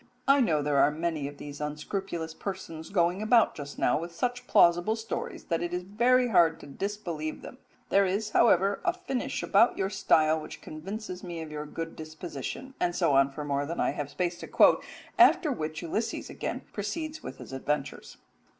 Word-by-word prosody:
I 275 0 +6
know 155 - +2
there 145 -1 +2
are 140 - +6
many 155 -1 -2
of 145 0 -9
these 145 0 -8
unscrupulous 160 +2 -4
persons 165 -4 -6
going 180 0 +1
about 225 +1 +4
just 145 -1 -8
now 125 - +2
with 170 +1 -7
such 245 +6 -2
plausible 175 +5 +4
stories 225 0 -5
that 165 -2 -1
it 175 0 -2
is 180 - -3
very 245 +6 +3
hard 170 -5 +4
to - - -10
disbelieve 165 -1 -4
them; 255 - -10 0.3
there 195 0 +4
is, 205 +3 -1
however, 200 -3 +4
a 355 -1 +2
finish 305 -9 -3
about 225 +5 +4
your 195 0 -1
style 160 -5 +3
which - - -9
convinces 185 +4 -7
me 175 -2 -6
of 155 - -9
your 150 0 -5
good 165 +2 -6
disposition," 160 - -7
and 175 -1 0
so - - +2
on 135 0 +5
for 150 +2 -6
more 140 0 -1
than 170 - -4
I - - +2
have 145 -1 -4
space 175 +3 -2
to - - -7
quote; - - +5 0.4
after 320 -5 +6
which 155 - -4
Ulysses 215 +7 -3
again - - -4
proceeds 315 -1 -4
with - - -8
his - - -10
adventures. 140 +1 -3
175 Hz, 190 wpm, -28 LUFS, 155-210 Hz, 0.4 s, I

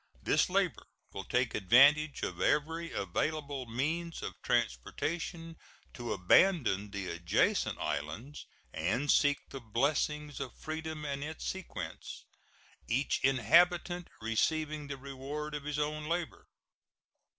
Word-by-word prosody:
This - - +3
labor - - 0 0.3
will 95 - -6
take 125 +2 +1
advantage 140 +9 +5
of - - -3
every 165 +3 +1
available 140 - -2
means 160 +8 -2
of - - -4
transportation 165 - -2 0.4
to 120 -1 -5
abandon 105 - +3
the 100 -2 -5
adjacent 85 0 +1
islands 110 - -4 0.3
and 110 - +1
seek 145 -1 +4
the 135 - -6
blessings 145 +5 0
of 125 - -6
freedom 155 -1 -5
and 140 -1 -3
its 160 +1 -6
sequence 190 -2 -6 0.6
each 135 +5 +1
inhabitant 170 - +3
receiving 150 +7 0
the 140 -1 -5
reward 140 +3 -6
of 145 -1 -5
his 150 0 -2
own 150 0 -2
labor. 170 -1 -3
145 Hz, 115 wpm, -32 LUFS, 120-155 Hz, 0.6 s, advantage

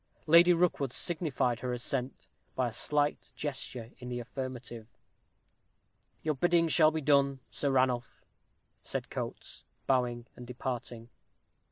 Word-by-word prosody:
Lady 170 +3 +7
Rookwood 165 -6 +2
signified 145 -8 +2
her 125 -1 -3
assent 125 +1 -2 0.3
by 130 -2 +1
a - - -11
slight 145 +5 -1
gesture 130 -5 -5
in 125 -1 -7
the 120 0 -3
affirmative. 120 -2 -6 1.4
"Your 155 - +1
bidding 170 +3 +2
shall 155 0 +6
be 160 0 -3
done, 140 -2 +3
Sir 140 - -1
Ranulph," 130 -2 0 0.6
said - - -5
Coates, - - -6 0.2
bowing 120 -2 +1
and 125 - -10
departing. 120 -2 -5
130 Hz, 125 wpm, -31 LUFS, 125-150 Hz, 1.4 s, Lady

